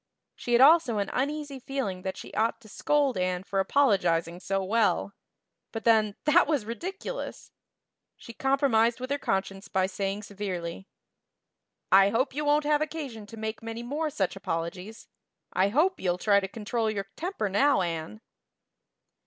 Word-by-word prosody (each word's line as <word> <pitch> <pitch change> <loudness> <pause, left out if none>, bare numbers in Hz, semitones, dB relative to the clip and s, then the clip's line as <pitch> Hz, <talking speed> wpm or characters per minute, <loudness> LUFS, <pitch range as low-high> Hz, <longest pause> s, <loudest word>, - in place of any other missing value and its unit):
She 240 - -3
had 240 - +6
also 285 -5 +6
an 200 -1 -1
uneasy 285 +1 -2
feeling 250 -8 -3
that 190 0 -4
she - - -10
ought 225 +1 0
to 220 - -15
scold 280 0 +1
Anne 180 0 -1
for 195 0 -2
apologizing 190 -7 +2
so 195 +1 -1
well; 205 0 +1 0.6
but 225 - -5
then, 215 -3 +3
that 310 +3 +5
was 290 -8 0
ridiculous! 375 - -6 0.7
She 235 - -11
compromised 255 -3 +2
with 255 +2 -5
her 285 - 0
conscience 195 -1 -2
by 190 -1 +1
saying 195 +2 -3
severely: 190 -3 -5 1.0
"I 195 +1 +7
hope 245 +7 0
you 300 +2 -2
won't 295 +1 +3
have 300 0 +2
occasion 285 -9 -5
to 225 - -11
make 220 0 -4
many 230 +1 -6
more 300 +6 -2
such 195 -10 -1
apologies. 180 +6 -5 0.5
I 190 +2 +3
hope 325 - +2
you'll 180 -2 0
try 200 +2 +4
to 195 - -4
control 220 +2 -2
your 200 -2 -3
temper 350 - -2
now, 205 +3 +3
Anne." 170 +4 -4
220 Hz, 160 wpm, -28 LUFS, 195-275 Hz, 1.0 s, I